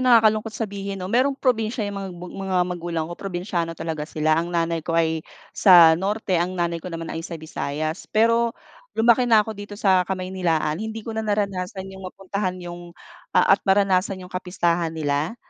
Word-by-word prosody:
nakakalungkot 225 -3 +4
sabihin, 200 -2 -4
no? 185 +1 -5
Merong 265 +3 +3
probinsya 230 -3 0
yung 200 -1 -4
mag 195 - -5
mga 185 +2 -4
magulang 175 -2 -3
ko. 170 - -7
Probinsiyano 175 -2 -3
talaga 155 -2 -4
sila. 155 +1 +1
Ang 170 - -4
nanay 170 -1 0
ko 165 +1 -2
ay 160 -1 +2 0.3
sa 175 -5 +8
Norte, 190 +1 0
ang 180 +2 -2
nanay 170 -1 -1
ko 180 - -7
naman 165 -1 -5
ay 165 - -4
sa 165 +1 -6
Visayas. 155 +1 -4
Pero 230 +1 +2 0.4
lumaki 235 +2 +4
na 220 -2 +6
ko 220 - -5
dito 205 0 -9
sa 190 -3 +3
Kamaynilaan. 185 -4 -1
Hindi 220 0 -5
ko 225 - -5
na 220 - -2
naranasan 200 -3 -2
yung 190 - -10
mapuntahan 190 0 -3
yung, 175 0 -9 0.4
ah, - - +6
at 195 - +4
maranasan 195 -1 +3
yung 180 - -14
kapistahan 175 -2 0
nila. 155 +4 -2
185 Hz, 180 wpm, -23 LUFS, 170-205 Hz, 0.4 s, sa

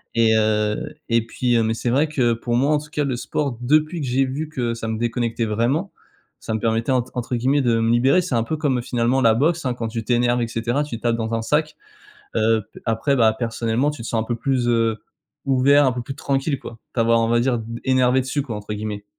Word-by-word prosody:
Et 115 -1 +4
heu, 110 +6 0 0.2
et 115 -1 +2
puis 120 +1 0
heu, 115 - +2
mais 110 0 0
c'est 120 - -2
vrai 145 +5 +3
que 125 -6 +1
pour 120 +1 -2
moi 140 +4 +2
en 150 - +2
tout 150 - -12
cas 150 -1 -1
le 130 - -1
sport 130 0 -3
depuis 155 +5 +2
que 135 - -3
j'ai 130 +2 +2
vu 145 +4 -4
que 120 -5 -2
ça 115 -1 -5
me 110 - -2
déconnectait 120 0 -1
vraiment, 120 - 0 0.5
ça 110 - -4
me 110 - -1
permettait 115 +3 0
ent 125 -2 +2
entre 125 0 -3
guillemets 135 +4 +2
de 115 -3 +2
me 115 0 +2
«libérer». 130 +9 +4
C'est 155 -8 -2
un 115 - +2
peu 155 +6 -3
comme, 135 -5 0
heu, - - -3
finalement 120 +2 0
la 115 -2 +5
boxe, 160 +6 +1
hein, 125 - 0
quand 115 -2 -3
tu 115 0 -4
t'énerves 120 +1 +2
et 115 - 0
cetera, 120 +6 -1
tu 120 -6 -6
tapes 120 0 +1
dans 115 0 -3
un 115 - -1
sac, 150 +4 0 0.6
heu, 110 0 +2
p - - -11
après, 115 +5 +1
bah, 110 -4 +4
personnellement 115 +3 0
tu 150 - -9
te - - -6
sens 115 -1 0
un - - -2
peu 120 0 -2
plus, 125 -1 0
heu, 115 -1 +2 0.5
ouvert, 140 +2 +4
un 125 - +1
peu 125 - -4
plus 135 - -6
tranquille, 140 0 -1
quoi, 120 - -9
de - - -14 0.2
t'avoir 115 -1 +3
on 115 - +1
va 120 - +3
dire 120 -1 +1 0.2
«énervé 130 0 +3
dessus», 135 +3 -2
quoi, 115 -6 -5
entre 105 0 -6
guillemets. 105 -1 -5
120 Hz, 255 wpm, -22 LUFS, 115-135 Hz, 0.6 s, la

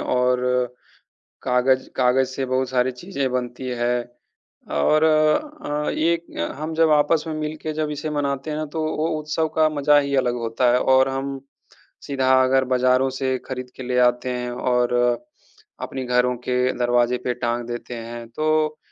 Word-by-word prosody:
और 125 0 +1 1.0
काग़ज़ 130 +1 +2
काग़ज़ 130 +1 +3
से 130 0 -3
बहुत 130 0 0
सारी 130 0 +2
चीज़ें 140 -1 -3
बनती 125 0 -3
हैं। 120 0 0 0.7
और 155 - +3
अ, 155 - +1
एक 170 +1 0 0.3
हम 155 +1 -4
जब 160 -1 +3
आपस 150 +2 +3
में 160 - -3
मिलके 155 0 -4
जब 155 0 -2
इसे 150 +1 -4
मनाते 140 0 -2
हैं 150 - -2
ना 155 - -2
तो 160 - -1
वो 155 +2 0
उत्सव 155 +1 -1
का 155 -1 +5
मज़ा 145 0 +4
ही 140 -1 0
अलग 125 -2 +1
होता 120 +2 +1
है। 125 - +4
और 130 +1 +4
हम, 135 0 -4 0.6
सीधा 135 -2 0
अगर 130 0 +3
बाज़ारों 130 +1 +3
से 130 -1 0
ख़रीद 130 -1 -6
के 130 - -8
ले 125 0 -1
आते 125 +1 +2
हैं 125 0 -4
और 125 0 0 0.9
अपने 130 -1 -4
घरों 125 0 +2
के 125 0 +1 0.2
दरवाज़े 120 0 +2
पे 125 - +1
टांग 120 0 -2
देते 120 +1 -6
हैं 115 0 -7
तो, 155 +3 0
130 Hz, 165 wpm, -22 LUFS, 125-150 Hz, 1.0 s, का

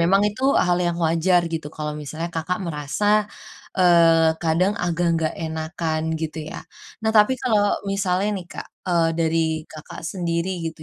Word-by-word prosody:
memang 195 +4 +4
itu 210 +5 -2
hal 180 0 +3
yang 175 -1 0
wajar 170 +2 +3
gitu. 160 -2 -3
Kalau 150 0 -3
misalnya 155 +3 -5
Kakak 165 +3 -2
merasa 205 +8 0 0.5
eee, 165 -3 +5
kadang 170 +4 +2
agak 175 0 0
nggak 160 -1 -1
enakan 160 0 -3
gitu 160 0 -4
ya. - - -6 0.5
Nah 220 - +2
tapi 210 +3 +5
kalau 210 -5 +2
misalnya 195 0 0
nih 175 - -12
Kak, - - -8 0.2
eee, 170 -2 +3
dari 165 0 +2 0.3
Kakak 155 -1 -10
sendiri 170 0 -2 0.2
gitu 160 -1 -7
170 Hz, 155 wpm, -22 LUFS, 160-190 Hz, 0.5 s, eee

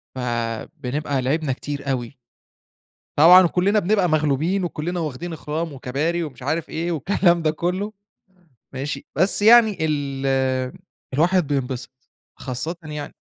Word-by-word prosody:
فبنبقى 125 +4 -3
لعبنا 140 +2 0
كتير 140 +1 -4
أوي. 125 0 -3 1.0
طبعًا 180 +4 +8
كلِّنا 190 +5 +2
بنبقى 200 -1 +2
مغلوبين، 155 +5 +1
وكلِّنا 175 +1 -3
واخدين 160 +2 -4
اخرام 160 +1 -4
وكباري 145 +6 -2
ومش 145 -6 -7
عارف 160 +5 -2
إيه، 170 +2 -2
والكلام 175 +2 +2
ده 155 - +2
كلُّه، 180 +6 -2 0.8
ماشي، 140 +1 -4
بس 185 +7 +2
يعني 220 -1 +6
ال 135 -3 -1 0.4
الواحد 170 +3 +2
بينبسط، 130 -2 -4 0.3
خاصةً 130 +7 -4
يعني 150 -2 -6
150 Hz, 115 wpm, -22 LUFS, 135-175 Hz, 1.0 s, طبعًا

